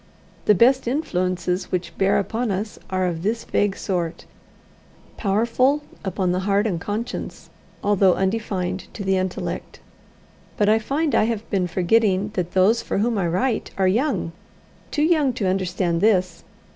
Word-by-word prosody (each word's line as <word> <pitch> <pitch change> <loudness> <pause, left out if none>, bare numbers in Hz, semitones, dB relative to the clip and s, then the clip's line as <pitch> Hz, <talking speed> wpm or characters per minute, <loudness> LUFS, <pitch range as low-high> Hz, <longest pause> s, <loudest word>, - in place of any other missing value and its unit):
The 210 - +5
best 250 +5 +4
influences 185 - -1
which 180 -1 -3
bear 195 0 +2
upon 225 +4 -1
us 205 +2 -3
are 185 -1 0
of 170 -2 -2
this 220 +5 -1
vague 205 -1 0
sort 175 -4 -3 0.9
powerful 235 +8 +1 0.2
upon 190 -2 -1
the 180 - 0
heart 200 +2 +1
and 180 -7 -1
conscience, 215 +5 -5 0.3
although 195 -3 +4
undefined 190 -2 -2
to 205 - -5
the 190 0 +2
intellect. 185 -1 -4 0.8
But 205 0 +3
I 220 +1 +4
find 285 +7 -1
I - - +4
have 225 -1 -3
been 190 -3 +1
forgetting 195 +3 +2
that 180 -4 -3
those 205 +5 +4
for - - -3
whom 230 +3 +1
I 175 - +1
write 220 +7 0
are 190 -1 +3
young 235 - 0 0.6
too 300 - 0
young 305 -5 +3
to 225 -4 -2
understand 185 -2 0
this. 185 -5 +2
195 Hz, 155 wpm, -22 LUFS, 185-225 Hz, 0.9 s, The